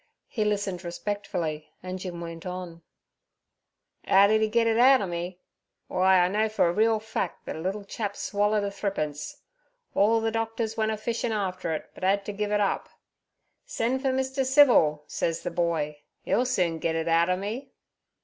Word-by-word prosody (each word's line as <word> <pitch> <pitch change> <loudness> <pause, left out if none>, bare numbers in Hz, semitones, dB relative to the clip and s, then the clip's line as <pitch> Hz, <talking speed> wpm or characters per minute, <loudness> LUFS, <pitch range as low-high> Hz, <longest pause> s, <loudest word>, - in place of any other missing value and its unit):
He 215 - -1
listened 200 -3 -1
respectfully, 175 -4 -4
and 185 0 -5
Jim 180 -2 -6
went 165 -1 -7
on: 180 -2 -6 1.3
"Ow 195 +1 +7
d'e 220 +1 +3
git 230 +1 +2
it 225 0 +2
outer 255 -3 +6
me? 175 0 -4 0.5
W'y, 185 - 0
I 185 -1 +5
know 215 +3 +1
for 215 -4 +2
a 170 - +1
reel 220 +2 +3
fac' 220 -4 -4
that - - -5
a - - -6
little 195 +4 -3
chap 205 0 -4
swallered 205 +1 0
a 200 - -2
thrippence. 150 -8 -4 0.5
Orl 220 +3 +4
ther 225 0 0
doctors 225 0 -2
went 220 -1 0
a 215 - -2
fishin' 230 +2 -2
after 185 -5 -2
it, - - -8
but - - -12
'ad 195 +1 +2
ter - - -3
giv' 205 +1 -2
it 210 - +2
up. 200 -1 0 0.8
"Sen' 265 - -1
fur 265 0 0
Mr. 265 +1 0
Civil," 250 - +5
says 165 +2 -2
ther - - -3
boy; 165 -3 -1 0.3
"'e'll 250 - +2
soon 175 -9 0
git 165 0 -1
it 165 0 -1
outer 170 +2 +3
me."' 220 +8 -5
200 Hz, 180 wpm, -27 LUFS, 175-220 Hz, 1.3 s, Ow